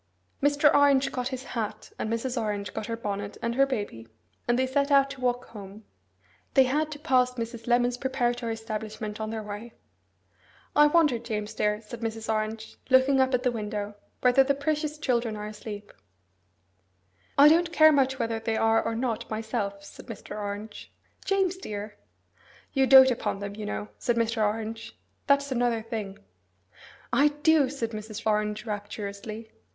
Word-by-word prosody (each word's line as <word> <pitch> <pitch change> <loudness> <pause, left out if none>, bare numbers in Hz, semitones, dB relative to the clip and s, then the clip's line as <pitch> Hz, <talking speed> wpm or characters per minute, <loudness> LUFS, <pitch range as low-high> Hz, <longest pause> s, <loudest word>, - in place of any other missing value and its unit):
Mr. 290 +1 +4
Orange 280 -1 +4
got 250 -1 -2
his 260 -1 -5
hat, 225 -5 -5
and 220 - -2
Mrs. 240 +2 -2
Orange 205 -4 -2
got 210 - -4
her 230 -1 -3
bonnet 205 -2 -4
and 235 0 -2
her 275 +2 +3
baby, 205 - -4 0.4
and 240 0 +2
they 260 - +2
set 280 +2 0
out 275 -1 +4
to 275 -2 -9
walk 245 0 0
home. 205 0 -11 0.7
They 265 - +8
had 300 +4 0
to - - -8
pass 255 -4 +2
Mrs. 230 -1 -6
Lemon's 245 0 +2
preparatory 245 -3 -1
establishment 215 -1 -5
on 215 - -3
their 220 -1 -4
way. 210 +3 -8 1.0
'I 295 0 +7
wonder, 295 -6 +3
James 215 -2 -4
dear,' 210 +1 0
said 230 +2 -9
Mrs. 225 -1 -2
Orange, 220 0 -4
looking 260 +1 +5
up 260 0 +2
at 250 - -2
the 250 - +2
window, 210 -2 -4 0.3
'whether 250 +2 +5
the 280 +1 +1
precious 300 +1 -2
children 240 -6 0
are 210 0 -5
asleep!' 210 -1 -8 1.4
'I 285 +2 +9
don't 335 +1 +3
care 315 -1 +7
much 265 -2 +2
whether 230 -2 -1
they 225 0 -1
are 225 0 +3
or 225 0 -2
not, 230 -2 -2
myself,' 215 -2 -3
said 200 - -13
Mr. 225 -2 -8
Orange. 210 +1 -6 0.3
'James 385 -2 +1
dear!' 210 - -6 0.8
'You 270 -1 +3
dote 265 0 +9
upon 235 - -2
them, 200 0 -6
you 215 0 -6
know,' 105 0 -4
said 240 - 0
Mr. 230 -1 +1
Orange. 225 +2 -3 0.3
'That's 280 0 +3
another 240 -3 +1
thing.' 215 -4 -5 1.0
'I 285 - +5 0.2
do,' 315 -4 +5
said 240 -5 -4
Mrs. 215 0 -7
Orange 210 0 0
rapturously. 210 +1 -6
230 Hz, 165 wpm, -27 LUFS, 215-265 Hz, 1.4 s, I